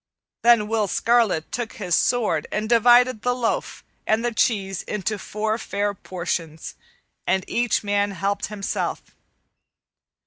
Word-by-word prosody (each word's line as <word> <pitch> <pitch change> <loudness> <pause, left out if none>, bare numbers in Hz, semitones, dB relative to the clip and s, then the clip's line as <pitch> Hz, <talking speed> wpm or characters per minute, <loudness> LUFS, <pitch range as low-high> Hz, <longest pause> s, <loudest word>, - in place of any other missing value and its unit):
Then 230 -3 +5
Will 220 -1 0
Scarlet 225 -7 +1
took 240 -2 -4
his 180 -5 -4
sword 210 -8 +1
and 215 +1 -2
divided 240 0 +5
the 245 0 0
loaf 240 -2 -2 0.2
and 220 +2 +2
the 240 - -1
cheese 195 -4 0
into 210 0 -3
four 215 +3 -2
fair 205 -1 -2
portions, 170 -4 -5 0.5
and 190 -1 +1
each 240 -2 0
man 205 0 +1
helped 200 +1 -2
himself. 205 -2 -3
210 Hz, 130 wpm, -23 LUFS, 195-235 Hz, 0.5 s, Then